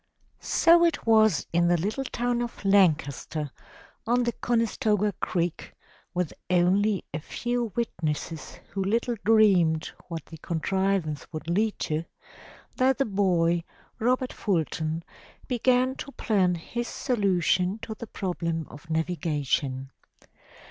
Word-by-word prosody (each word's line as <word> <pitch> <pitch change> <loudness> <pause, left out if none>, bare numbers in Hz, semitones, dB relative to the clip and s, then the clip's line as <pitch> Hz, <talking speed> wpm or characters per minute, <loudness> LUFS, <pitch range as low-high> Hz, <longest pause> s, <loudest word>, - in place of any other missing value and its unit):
So 340 +1 +5
it 335 -3 +1
was 220 -2 +4
in 170 0 +3
the 175 0 +4
little 210 +10 -2
town 240 -1 -1
of 235 -3 -6
Lancaster 155 -6 +2 0.6
on 245 +1 +3
the 240 - +1
Conestoga 220 -3 +1
Creek, 175 -1 -2 0.4
with 180 -3 -1 0.2
only 190 +3 +2
a 155 - -2
few 240 +7 -2
witnesses 160 -8 -3 0.2
who 195 - -1
little 230 +4 0
dreamed 185 -7 +4 0.2
what 165 -3 -6
the 160 - -11
contrivance 180 -2 -1
would 155 0 -6
lead 210 +5 +1
to, 155 +2 -1 0.7
that 260 0 +3
the 275 - +2
boy, 175 -4 +2 0.4
Robert 250 +2 +1
Fulton, 160 -4 -1 0.4
began 255 +1 +2
to 280 - -7
plan 190 -5 +2
his 235 +8 -4
solution 190 -5 +1
to 225 - -4
the 225 +1 -8
problem 170 -5 -3
of 150 +3 -13
navigation. 145 -5 -1
190 Hz, 120 wpm, -27 LUFS, 165-230 Hz, 0.7 s, So